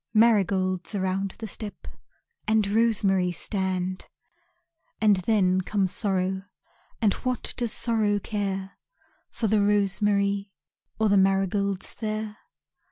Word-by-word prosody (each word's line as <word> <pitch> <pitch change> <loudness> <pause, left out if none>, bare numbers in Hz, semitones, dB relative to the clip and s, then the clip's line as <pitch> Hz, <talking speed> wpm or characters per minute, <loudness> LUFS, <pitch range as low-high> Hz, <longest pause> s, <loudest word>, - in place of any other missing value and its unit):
Marigolds 190 -5 +2
around 190 0 -1
the 225 - -6
step 210 -1 -8 0.6
And 220 -1 +3
rosemary 200 -4 +2
stand, 185 0 -2 0.9
And 210 -3 +4
then 185 -1 +2
comes 190 0 0
Sorrow 190 -2 -1 0.5
And 210 -4 +3
what 255 -1 -2
does 240 -3 -1
Sorrow 215 -3 +1
care 195 -2 -4 0.5
For 230 - -4
the 215 0 +3
rosemary 200 0 +1 0.4
Or 220 - +2
the 200 -1 +4
marigolds 195 0 +1
there? 215 -1 -4
200 Hz, 105 wpm, -26 LUFS, 190-215 Hz, 0.9 s, And